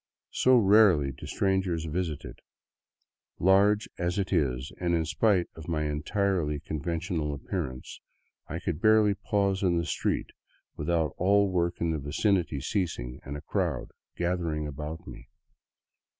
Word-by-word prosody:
So 130 0 +4
rarely 100 - +5
do 65 - -10
strangers 95 -4 0
visit 80 -2 -3
it - - -9
that, - - -26 1.0
large 100 +3 +4
as 85 +2 -1
it 100 -2 -1
is 65 -2 0
and 85 -1 +1
in 80 -1 0
spite 95 +1 +2
of 80 -1 -11
my 80 -2 -1
entirely 75 +1 0
con 75 +1 -5
ventional 80 -2 -2
appearance, 70 -4 -5 0.5
I 80 - -4
could 85 -2 -3
barely 110 -1 +5
pause 100 -1 0
in 90 -3 +2
the 85 - 0
street - - -1 0.4
without 80 0 0
all 100 +1 +3
work 85 -1 0
in 85 -1 0
the 80 - -1
vicinity 80 +2 0
ceasing 75 - -2
and 70 +1 -6
a - - -8
crowd 75 - -2 0.3
gathering 85 -3 -1
about 75 +2 -6
me. - - -11
85 Hz, 150 wpm, -28 LUFS, 75-95 Hz, 1.0 s, rarely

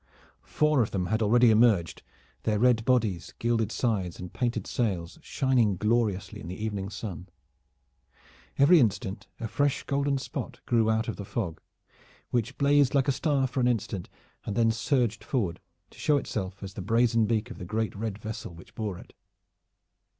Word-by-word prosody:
Four 150 -3 +2
of 110 - +1
them 95 -2 -1
had 110 +5 0
already 120 +2 +5
emerged, 105 -8 +3 0.4
their 105 -1 0
red 120 0 +3
bodies, 110 -9 +1
gilded 115 -2 0
sides 100 -10 -1
and 90 -1 -8
painted 120 -2 -1
sails 95 -8 -2
shining 120 -7 +1
gloriously 105 -2 0
in - - -8
the 90 - -5
evening 105 -2 -3
sun. 95 -4 -7 1.3
Every 160 +5 +7
instant 105 -4 0
a 115 - -3
fresh 145 +4 0
golden 140 0 0
spot 125 -2 -6
grew 115 -2 +2
out 110 +1 +1
of 115 - -4
the 100 - -5
fog, 95 -5 -4 0.7
which 120 +1 -1
blazed 140 -1 +3
like 135 -1 +3
a - - +5
star 140 0 +1
for 130 +1 -3
an 125 - +3
instant, 105 -6 -2 0.3
and 100 - -4
then 115 0 +3
surged 120 -1 0
forward 100 -11 -1 0.3
to - - -17
show 150 - +3
itself 100 -6 -4
as 95 -1 -7
the 100 - -6
brazen 115 +2 +2
beak 115 +1 -1
of - - -9
the - - -6
great 110 +4 -2
red 105 -1 -3
vessel 110 -5 -7
which 85 - -15
bore 105 -5 -4
it. - - -14
110 Hz, 170 wpm, -28 LUFS, 100-125 Hz, 1.3 s, Every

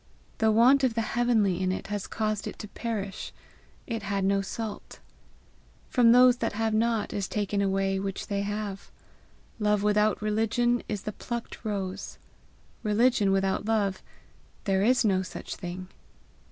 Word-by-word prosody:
The 220 -1 +4
want 250 +5 +5
of 250 -4 +2
the 230 - +1
heavenly 220 -6 +2
in 185 0 +1
it 185 - -4
has 205 -2 -3
caused 215 -2 -2
it - - -7
to 210 - -7
perish: 205 -3 -4 0.5
it 225 -2 -3
had 200 -1 -1
no 195 0 +2
salt. 215 +2 -6 0.9
From 235 -2 +5
those 250 0 +7
that 230 -3 -2
have 220 +1 0
not 225 -1 +1
is 195 -2 -2
taken 205 -1 -1
away 195 0 +1
that - - -4
which 195 -1 -4
they 200 -1 -2
have. 205 -1 -4 0.7
Love 210 -1 +2
without 210 0 +3
religion 225 +3 +1
is 210 -2 -3
the 215 - -3
plucked 235 +1 -6
rose. 195 -3 -4 0.6
Religion 215 -1 +3
without 195 +1 +1
love 205 -4 0 0.6
there 195 -1 +1
is 245 +3 +3
no 190 -3 +3
such 185 - -7
thing. 180 0 -6
210 Hz, 155 wpm, -27 LUFS, 195-225 Hz, 0.9 s, those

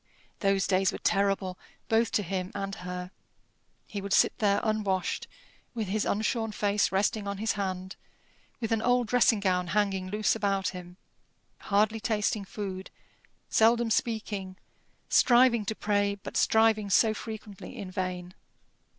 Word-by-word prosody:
Those 195 -1 +2
days 190 0 +2
were - - -5
terrible 195 -2 0 0.3
both 225 0 +2
to 205 - +2
him 185 0 -3
and 195 0 -3
her. 180 -1 -6 0.7
He 205 - -6
would 200 0 -3
sit - - +4
there 205 -2 +3
unwashed, 205 -4 -1 0.5
with 220 -4 -3
his 215 +2 0
unshorn 220 +1 -1
face 205 0 +1
resting 200 +2 0
on 200 0 -3
his 220 +2 0
hand, 190 -2 -4 0.6
with 230 -2 -3
an 225 -1 +1
old 245 +1 +2
dressing 245 -3 +4
gown 180 -2 0
hanging 195 -1 0
loose 210 +2 +1
about 195 -3 0
him, 180 -1 -10 0.6
hardly 215 +2 +1
tasting 210 -1 -1
food, 190 -1 -6 0.6
seldom 230 +1 +3
speaking, 205 -5 -2 0.5
striving 240 -3 +4
to 220 - -2
pray, 205 -1 0
but 195 - -10
striving 220 -2 +3
so 215 +3 +4
frequently 215 -3 -8
in 185 -2 -6
vain. 185 -1 -4
200 Hz, 140 wpm, -28 LUFS, 190-220 Hz, 0.7 s, sit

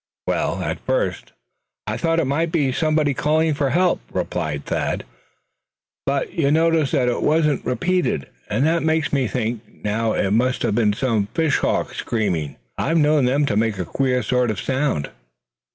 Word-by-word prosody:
"Well, - - -1
at - - -3
first - - -2 0.5
I - - -2
thought 165 -1 +1
it 165 - +1
might 160 +5 0
be 145 -6 +1
somebody 155 0 +1
calling 155 +3 +2
for 140 -2 0
help," 180 +4 +2
replied 75 -5 -3
Thad, - - -1
slowly; - - -22 1.0
"but 140 0 -1
you 145 -5 +1
notice 160 -1 +3
that 125 - +1
it 120 - 0
wasn't 150 -2 +2
repeated. 180 - 0 0.2
And 110 +7 +1
that 165 +1 +2
makes 160 -1 0
me 135 -3 +2
think 115 -1 -2 0.2
now 110 +2 0
it 95 - 0
must 125 +4 +1
have - - +1
been 105 -2 +2
some 110 -4 0
fishhawk 160 -3 +1
screaming. 90 -10 -2 0.2
I've 165 - +1
known 150 -3 +4
them 140 +4 +2
to 115 - 0
make 110 -1 +1
a 90 - -3
queer 125 +6 0
sort 125 -1 +1
of 110 - -2
a - - -4
sound." 130 - -1
135 Hz, 175 wpm, -21 LUFS, 115-160 Hz, 1.0 s, known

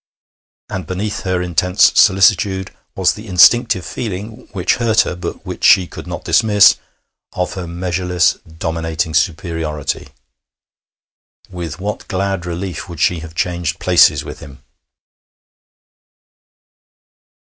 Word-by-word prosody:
And 95 -5 -6
beneath 100 +3 -3
her 90 -1 0
intense 90 +2 +3
solicitude 95 -1 +3 0.2
was 95 -2 +2
the 110 +2 -11
instinctive 95 +1 +4
feeling, 110 +2 -6
which 95 -4 0
hurt 115 -2 +3
her, - - -3
but 85 -1 -7
which - - -7
she 95 - +6
could - - -10
not - - -7
dismiss, 105 -3 +5 0.6
of 90 -1 -2
her 90 -4 -6
measureless, 90 0 0
dominating 80 -1 -3
superiority. 80 -4 -2 1.4
With 85 -3 -6
what 105 +2 -5
glad 95 -2 -2
relief 90 +1 -5
would 85 -3 -9
she 85 +1 +1
have 80 0 -10
changed 85 -1 -2
places 90 -2 +4
with - - -9
him! 70 -2 -13
90 Hz, 115 wpm, -17 LUFS, 85-95 Hz, 1.4 s, she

